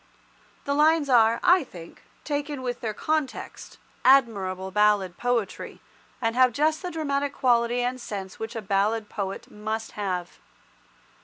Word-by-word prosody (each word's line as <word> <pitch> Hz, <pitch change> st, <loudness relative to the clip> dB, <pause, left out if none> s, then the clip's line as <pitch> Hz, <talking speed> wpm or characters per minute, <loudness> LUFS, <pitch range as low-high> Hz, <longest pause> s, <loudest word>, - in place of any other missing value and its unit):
The 280 Hz, -, 0 dB
lines 305 Hz, 0 st, +3 dB
are, 230 Hz, -2 st, +5 dB
I 360 Hz, -1 st, +5 dB
think, 170 Hz, -9 st, -12 dB, 0.2 s
taken 290 Hz, -2 st, -3 dB
with 245 Hz, -1 st, -3 dB
their 225 Hz, -, -2 dB
context, 310 Hz, -2 st, -3 dB, 0.3 s
admirable 195 Hz, -8 st, +3 dB
ballad 205 Hz, -3 st, +2 dB
poetry, 245 Hz, -5 st, -2 dB, 0.4 s
and 230 Hz, -1 st, -1 dB
have 255 Hz, -1 st, +4 dB
just 310 Hz, +4 st, +1 dB
the 360 Hz, -, -4 dB
dramatic 285 Hz, -4 st, -2 dB
quality 240 Hz, -1 st, +2 dB
and 250 Hz, +1 st, -2 dB
sense 195 Hz, -4 st, -6 dB
which 225 Hz, +2 st, -5 dB
a 225 Hz, -, -4 dB
ballad 205 Hz, +3 st, 0 dB
poet 195 Hz, -2 st, -5 dB
must 220 Hz, +1 st, -4 dB
have. 180 Hz, -4 st, -4 dB
235 Hz, 140 wpm, -25 LUFS, 210-280 Hz, 0.4 s, are